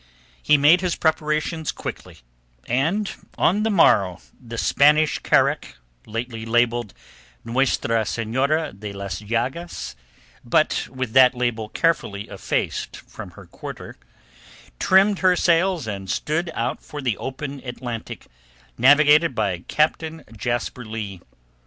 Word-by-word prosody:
He 150 - +4
made 155 +6 +5
his 180 -2 0
preparations 155 0 0
quickly, - - -8 0.5
and 160 - 0 0.3
on 200 +6 +2
the 220 - +1
morrow 100 - +4 0.3
the 115 -1 -8
Spanish 150 +5 +3
carack—lately 110 - -2
labelled 120 -1 +1 0.5
Nuestra 115 -2 +1
Senora 135 +8 0
de 100 +1 -8
las 100 +1 -5
Llagas, 120 - -3 0.5
but - - +1
with 130 -2 -5
that 130 -1 +6
label 120 -3 -2
carefully 125 -12 -1
effaced 100 - -3
from - - -10
her - - -11
quarter—trimmed 185 - -2
her 185 -1 +4
sails 175 -2 +2
and 100 -3 -6
stood 165 +3 -1
out 115 - -2
for 150 - -9
the 125 -6 0
open 135 +1 -6
Atlantic, 120 -2 -6 0.5
navigated 145 +3 +5
by 100 -5 -1
Captain 160 +1 0
Jasper 120 +3 -3
Leigh. 105 -5 -6
130 Hz, 115 wpm, -22 LUFS, 110-155 Hz, 0.5 s, that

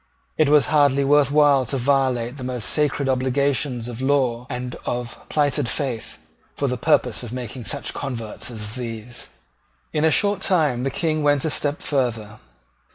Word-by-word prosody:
It 155 -2 +3
was 150 -1 +5
hardly 140 -2 +4
worth 145 0 +4
while 145 -2 +4
to 135 - -1
violate 130 -1 +1
the 130 - -7
most 125 -3 -3
sacred 145 -2 +1
obligations 130 -1 0
of 120 0 -6
law 130 -3 +1
and 125 -1 -4
of 120 -1 -3
plighted 145 -4 +1
faith, 125 -6 -3 0.4
for - - -1
the - - -1
purpose - - +1
of 120 - -7
making 125 -1 -6
such 140 -2 -2
converts 120 -6 -5
as 105 -3 -6
these. 120 -1 -6 0.6
In 150 - +1
a 160 - +5
short 205 +5 +2
time 150 -10 +2
the - - +1
King 155 +2 -1
went 145 -1 +2
a 160 - 0
step 145 +1 -1
further. 115 -7 -2
135 Hz, 165 wpm, -22 LUFS, 120-145 Hz, 0.6 s, was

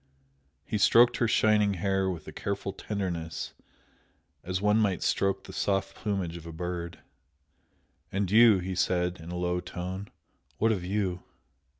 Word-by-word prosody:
He 105 - -2
stroked 120 +3 +6
her 120 - +2
shining 105 -3 +3
hair 95 +1 0
with 85 -4 -6
a - - -6
careful 100 -1 -3
tenderness 90 -5 -4 0.9
as 90 +1 -2
one 105 +1 +3
might 100 -5 +1
stroke 100 0 +1
the - - -11
soft 95 -1 0
plumage 95 -5 -2
of 85 -1 -10
a - - -6
bird. 85 +1 -5 1.1
"And 95 -1 -1
you?" 110 -1 +7
he 95 +1 -3
said, 90 0 0
in 80 +1 -9
a 90 - -4
low 90 0 0
tone 90 +2 -6 0.5
"What 115 +1 +3
of 95 -5 -1
you?" 95 -1 -1
95 Hz, 155 wpm, -28 LUFS, 90-100 Hz, 1.1 s, you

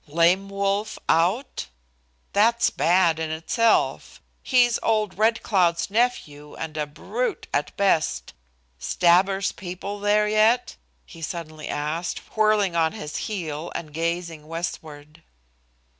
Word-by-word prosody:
"Lame 170 +6 +2
Wolf 200 +2 -1
out? 185 - +1 0.7
That's 230 +3 +3
bad 170 0 +3
in 160 -1 -2
itself! 165 +9 0 0.2
He's 245 -3 +3
old 215 -3 0
Red 225 +1 +2
Cloud's 180 -3 +1
nephew 155 -11 -1
and 160 -1 -6
a 150 -1 -2
brute 215 +11 -3
at 145 +1 -1
best. 160 - +1 0.5
Stabber's 190 - +2
people 195 +2 -7
there 210 +1 +2
yet?" 215 +3 +2 0.3
he 165 - -13
suddenly 155 -2 -6
asked, 155 +4 -3 0.2
whirling 215 -4 +2
on 160 -1 +2
his 150 -9 -7
heel 165 -6 -4
and 155 -3 -6
gazing 165 -1 -3
westward. 155 -2 -7
180 Hz, 115 wpm, -24 LUFS, 160-210 Hz, 0.7 s, That's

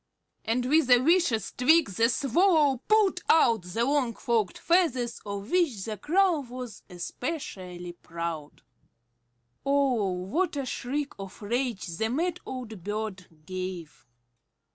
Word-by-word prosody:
And 245 +2 0
with 295 0 +3
a 245 - +8
vicious 270 - +2
tweak 300 -1 +4
the 230 +5 +2
Swallow 290 - +3
pulled 430 -2 +3
out 230 -9 +5
the 225 +7 -1
long 270 -5 +1
forked 225 -6 0
feathers 265 -9 +1
of 200 +1 -5
which 315 - +1
the 220 -2 -4
Crow 345 - +2
was 250 -4 -8
especially 180 - -5
proud. 170 -3 -6 1.0
Oh, 275 -7 +2
what 205 - -1
a 275 - -2
shriek 275 +3 -3
of 195 0 -8
rage 240 -1 -1
the 180 +6 -2
mad 340 +7 -1
old 225 -8 -7
bird 205 -3 -4 0.2
gave! 185 -8 -6
240 Hz, 125 wpm, -27 LUFS, 195-290 Hz, 1.0 s, a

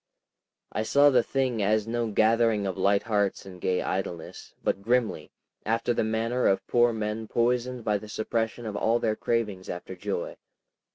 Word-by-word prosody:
I - - -1
saw 140 +6 +5
the 125 -2 +5
thing 130 -3 -1
as 105 +1 +2
no 120 0 -1
gathering 110 0 +3
of 95 - -2
light 100 +1 +2
hearts 105 -3 0
and 90 -2 -11
gay 90 -1 0
idleness, 90 -3 -5
but - - 0
grimly—after 115 +1 -1
the - - 0
manner 115 +3 0
of 95 0 +1
poor 120 0 +3
men 110 0 -3
poisoned 120 +1 0
by 105 -1 +1
the 105 - -11
suppression 110 +2 -2
of 105 -2 -4
all 115 +3 +2
their 110 -2 0
cravings 105 -6 -2
after 90 +2 -6
joy. 95 -1 -4
110 Hz, 165 wpm, -27 LUFS, 100-120 Hz, -, saw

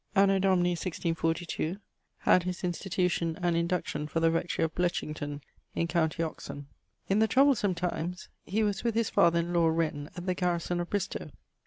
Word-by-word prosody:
Anno 195 0 +5
Domini 185 -2 +3
1642, 165 0 -2 0.4
had 185 - +5
his 180 +1 -4
institution 175 -2 -1
and 175 -2 +1
induction 170 -3 -1
for 165 - -1
the 165 0 +3
rectorie 165 0 0
of 160 - -4
Bletchington 150 -4 -2 0.3
in 170 - 0
com. 165 -2 +2
Oxon. 155 -3 -4 0.4
In 195 +2 +2
the 220 - +4
troublesome 255 -6 +3
times 180 0 -3 0.2
he 215 +4 0
was 205 -2 -1
with 230 -2 0
his 230 -1 +1
father 170 0 +4
in 170 +1 -4
lawe 170 -1 +4
Wren 160 -2 -1
at 175 - -6
the 185 - +1
garrison 175 -1 -1
of 175 - -3
Bristowe. 205 -3 -2
175 Hz, 170 wpm, -29 LUFS, 165-185 Hz, 0.4 s, Anno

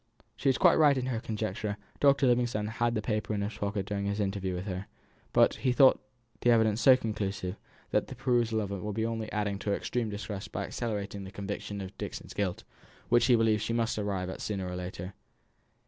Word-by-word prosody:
She 135 - +1
was 130 - +3
quite - - +5
right 145 -3 +6
in 130 - -1
her 125 -3 -1
conjecture; 110 -2 -3 0.2
Dr. 140 -1 +5
Livingstone 120 -3 +2
had 110 +2 -3
had 120 0 +1
the 105 - -1
paper 105 -1 -1
in 100 - -1
his 100 +2 -3
pocket 100 -1 -2
during 100 0 -2
his 100 +1 -1
interview 95 -2 -1
with 90 +2 -4
her; 95 -1 -4 0.4
but - - +5
he 130 - +1
thought 130 +1 +6 0.4
the 120 - +2
evidence 110 -1 +4
so 130 -2 +8
conclusive, 100 -5 -3 0.4
that - - +1
the - - -8
perusal 115 -3 +1
of 100 -1 -4
it 100 -2 -4
would 105 +2 -3
only 115 -1 -2
be - - -10
adding 105 -2 -1
to 105 - -3
her 100 - +2
extreme 120 0 -2
distress 100 -1 -5
by - - -4
accelerating 100 -4 -4
the 95 - -7
conviction 100 0 -5
of 95 0 -8
Dixon's - - -6
guilt, 100 -3 -2 0.5
which 120 0 +4
he 125 - +6
believed 110 -2 +3
she 115 +1 -1
must 115 -1 0
arrive 100 -3 -2
at - - -8
sooner 95 -3 -3
or 90 - -4
later. 90 +1 -6
105 Hz, 220 wpm, -30 LUFS, 100-115 Hz, 0.5 s, so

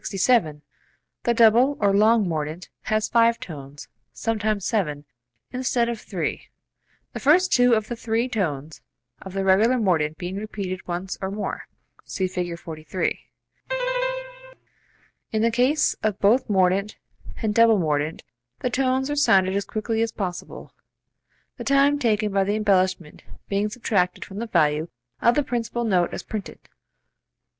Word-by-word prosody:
42.] - - -20
67. 175 -9 +2 0.6
The 235 - +3
double 235 +5 +5
(or 200 -1 +3
long) 215 +1 +4
mordent 160 +1 -4 0.2
has 215 0 0
five 230 0 +3
tones 145 -3 -9 0.2
(sometimes 215 -3 -1
seven) 150 -10 -1 0.5
instead 250 -2 0
of 230 -2 -4
three, - - -4 0.7
the - - -5
first 355 +6 +4
two 245 -1 +5
of 215 -1 -1
the 240 - -4
three 230 +1 -1
tones 160 - -3 0.4
of 190 - -9
the 195 0 -1
regular 210 +7 +4
mordent 160 -8 +1
being 180 +2 -5
repeated 200 -3 -5
once 180 +2 -4
or 190 - -2
more. 205 +2 -5 0.4
(See 190 - -3
Fig. 180 -2 -4
43.) 160 +2 -3 2.1
In 220 0 0
the 230 - +3
case 255 +6 +2
of 215 -2 0
both 230 +6 +3
mordent 195 +1 +2 0.5
and 215 -1 +1
double 230 0 +5
mordent 155 -2 -1 0.4
the 250 - -1
tones 260 0 +1
are - - -1
sounded 195 -10 +3
as 200 -1 -1
quickly 220 +1 -2
as 230 0 0
possible, 185 -5 -6 0.8
the - - -6
time 280 +1 +3
taken 215 -4 +1
by 195 0 +2
the 205 +2 0
embellishment 185 -6 0 0.3
being 205 +1 0
subtracted 200 -6 -1
from 195 0 -8
the 235 - -4
value 155 -5 +2 0.3
of 235 +1 +4
the 295 - +2
principal 240 -2 -2
note 185 -6 +1
as - - -6
printed. 215 -2 -6
210 Hz, 150 wpm, -24 LUFS, 180-235 Hz, 2.1 s, double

